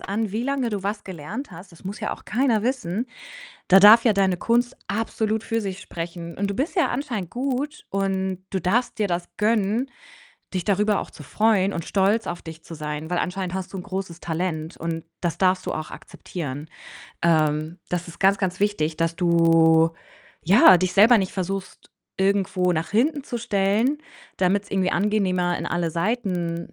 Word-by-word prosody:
an, 205 +1 -3
wie 225 +3 -1
lange 270 -3 -1
du 205 -2 -3
was 205 +2 -3
gelernt 190 - -7
hast. 180 +2 -12
Das 170 +3 -18
muss 200 +3 -6
ja 215 - -2
auch - - -19
keiner 240 -3 +1
wissen. 235 -4 -1 0.6
Da 190 +1 +8
darf 215 +4 +8
ja 230 - +5
deine 195 -2 +2
Kunst 240 +6 +1
absolut 220 0 -1
für 230 0 -1
sich 195 -2 -4
sprechen, 170 0 -7
und 200 +1 -1
du 200 - -2
bist 275 - -2
ja 355 - +2
anscheinend 235 - -3
gut, 275 +4 -3
und 190 -1 -2
du 190 - -1
darfst 240 +7 0
dir 210 - +2
das 175 -1 -2
gönnen, 220 +3 +1 0.7
dich 180 -2 -1
darüber 210 0 +2
auch - - -8
zu 150 - -12
freuen 200 +2 +2
und 170 - -3
stolz 205 +3 +1
auf 175 - -4
dich 160 0 -10
zu 165 - -9
sein, 150 +1 -5
weil 175 - 0
anscheinend 180 0 -2
hast 190 0 -5
du - - -3
'n - - -5
großes 190 -3 -5
Talent, 160 -1 -3
und 165 -1 -4 0.2
das 175 -2 -1
darfst 185 -1 +2
du - - -1
auch 155 0 -5
akzeptieren. 150 -3 -7 0.5
Ähm, 155 0 +1
das 175 0 -3
ist 170 - -11
ganz, 195 +1 +5
ganz 185 -2 -2
wichtig, 165 -7 0
dass 165 0 0
du, 165 -1 +4 0.5
ja, 205 - +8
dich 180 +1 -1
selber 220 +5 +7
nicht 190 -2 -2
versuchst, 195 0 -5 0.3
irgendwo 190 -2 +1
nach 165 0 -2
hinten 275 +6 +1
zu 240 - -4
stellen, 220 +4 +1 0.4
damit's 195 +2 +1
irgendwie 190 -1 +1
angenehmer 185 -3 +1
in - - -4
alle 175 -1 -1
Seiten 175 -3 -2
190 Hz, 185 wpm, -23 LUFS, 170-215 Hz, 0.7 s, Da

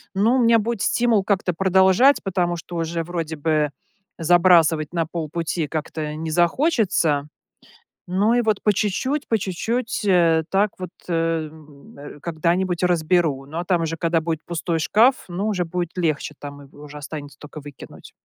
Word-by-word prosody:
ну, 220 +6 +3
у - - +2
меня 230 0 +5
будет 225 -1 -3
стимул 235 -4 +2
как-то 190 -2 0
продолжать, 190 +9 +4
потому, 175 -3 -1
что 175 +1 -9
уже 165 0 -2
вроде 165 -2 -4
бы 150 -1 0 0.5
забрасывать 165 -2 +4
на 165 -2 -1
полпути 165 0 -3
как-то 155 0 -4
не 160 +1 -5
захочется. 175 - +1 0.8
Ну 200 +6 +2
и 245 - +3
вот, 215 -3 0
по 210 - +3
чуть-чуть, 260 +9 -1
по 225 - +2
чуть-чуть, 225 +6 -3
э, 170 -4 +3
так 200 +2 +2
вот, 185 -2 -6 0.2
э, 165 -2 0
м, 150 -3 -17
э, 145 +1 -11
когда-нибудь 175 +3 -1
разберу, 165 -5 +1
но 165 +5 -5
там 175 -2 +1
уже 165 0 -2
когда 165 0 0
будет 160 -1 -3
пустой 170 0 -2
шкаф, 235 - +4
ну, 185 +4 -3
уже 185 -4 -1
будет 175 0 -3
легче, 155 -4 -1
там 145 0 -9
и - - -14
уже 150 0 -10
останется 145 -2 -8
только 150 +1 -10
выкинуть. 145 -2 -12
170 Hz, 165 wpm, -22 LUFS, 155-190 Hz, 0.8 s, меня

